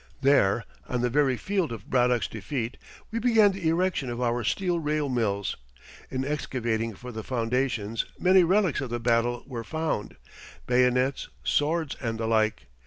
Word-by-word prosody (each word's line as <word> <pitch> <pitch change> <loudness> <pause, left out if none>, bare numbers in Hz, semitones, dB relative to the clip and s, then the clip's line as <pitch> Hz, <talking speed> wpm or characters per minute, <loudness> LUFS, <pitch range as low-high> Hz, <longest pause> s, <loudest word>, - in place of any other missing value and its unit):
There, 125 -6 +3 0.2
on 125 -1 -1
the 125 0 +1
very 135 -2 +2
field 190 -3 -1
of 110 -3 -7
Braddock's 125 -2 +2
defeat, 125 -4 -4 0.4
we 230 - -1
began 225 -3 +5
the 190 -4 -3
erection 170 -5 0
of 120 0 -4
our 120 -1 0
steel 175 - 0
rail 150 -2 -1
mills. 100 -6 -1 0.5
In 130 0 -2
excavating 120 -6 -2
for 125 +5 -9
the 110 -1 -6
foundations 115 -2 -1
many 185 0 +5
relics 185 -3 +2
of 135 - -4
the 120 0 -2
battle 120 +1 +1
were 125 -4 -5
found 160 -6 -3 0.5
bayonets, 125 +2 +2
swords, 155 0 +1
and 115 -3 -2
the 115 - -1
like. 110 -1 +1
125 Hz, 160 wpm, -27 LUFS, 115-155 Hz, 0.5 s, began